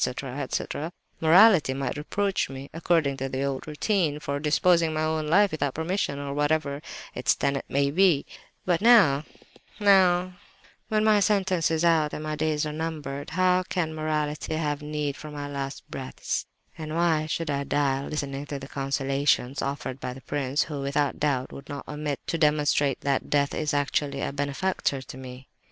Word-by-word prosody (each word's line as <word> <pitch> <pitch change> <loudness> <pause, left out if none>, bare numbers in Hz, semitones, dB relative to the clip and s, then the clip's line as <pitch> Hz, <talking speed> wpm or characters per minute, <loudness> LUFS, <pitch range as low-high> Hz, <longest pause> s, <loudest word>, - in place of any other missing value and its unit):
etc.—morality 155 - +2
might 135 -2 -2
reproach 195 +6 -1
me, 135 +1 -8
according 165 -4 +1
to 135 0 -4
the 130 +1 -2
old 140 0 -3
routine, 155 -1 0
for 140 -1 -3
disposing 165 +3 +3
of 160 - -3
my 155 0 +1 0.2
life 185 +6 +3
without 145 -3 -2
permission—or 150 -5 -2
whatever 145 -1 0 0.3
its - - +1
tenet 140 0 -1
may 140 0 +1
be. 170 -3 +3 0.4
But 175 -1 +1
now, 195 -12 +6 0.5
now, 185 -3 +4 0.5
when 215 -1 +1
my 215 -1 +5
sentence 190 -4 +2
is 160 +1 +1
out 160 -3 +3
and 155 - -5
my 155 0 -2
days 155 0 0
numbered! 150 -2 -4
How 185 +2 +3
can 175 -3 -2
morality 155 0 -2
have 150 -2 -1
need 150 -1 -3
of 155 - -7
my 145 -1 -5
last 140 -1 -5
breaths, 130 -1 -4 0.3
and 155 -1 -6
why 165 -2 +2
should 160 -1 -2
I 140 0 -1
die 140 -1 0
listening 145 -1 -4
to 140 - -4
the 135 0 -8
consolations 135 -1 0
offered 140 -1 -4
by 125 - -4
the 135 - -11
prince, 140 +1 -1
who, 145 -3 -5
without 140 +1 0
doubt, 135 -4 0
would 140 +1 -11
not 145 - -6
omit 150 -1 -3
to 165 - -2
demonstrate 150 -2 +2
that 140 -1 -1
death 140 -1 +2
is 155 -2 -1
actually 145 -1 0
a - - -2
benefactor 140 0 -1
to - - -10
me? 130 0 -10
150 Hz, 165 wpm, -26 LUFS, 140-165 Hz, 0.5 s, now